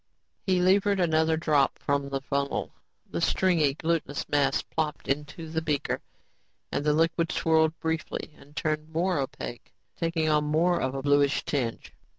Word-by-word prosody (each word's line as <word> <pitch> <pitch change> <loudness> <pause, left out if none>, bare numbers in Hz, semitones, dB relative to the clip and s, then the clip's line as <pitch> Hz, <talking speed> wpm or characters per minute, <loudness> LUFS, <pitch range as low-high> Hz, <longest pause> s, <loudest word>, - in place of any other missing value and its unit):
He 185 -1 +3
levered 195 +2 +3
another 160 -2 +2
drop 150 -4 +2
from 140 -1 -1
the 135 -1 -2
funnel. 140 +1 -2 0.4
The - - -2
stringy, 165 -7 +2
glutenous 160 -3 -1
mass 145 -1 +2
plopped 155 -1 -3
into 150 +4 -3
the 160 +1 -2
beaker 150 -3 -1 0.7
and - - -1
the 150 0 +3
liquid 165 +1 +1
swirled 160 0 +2
briefly 160 -1 -3
and 145 +1 -18
turned 155 0 -2
more 170 +1 0
opaque, 130 -2 -6 0.2
taking 165 -1 0
on 150 -1 +3
more 165 +4 +2
of 130 +1 -1
a 135 - -4
bluish 145 0 +3
tinge. 125 -6 -2
155 Hz, 155 wpm, -27 LUFS, 140-165 Hz, 0.7 s, He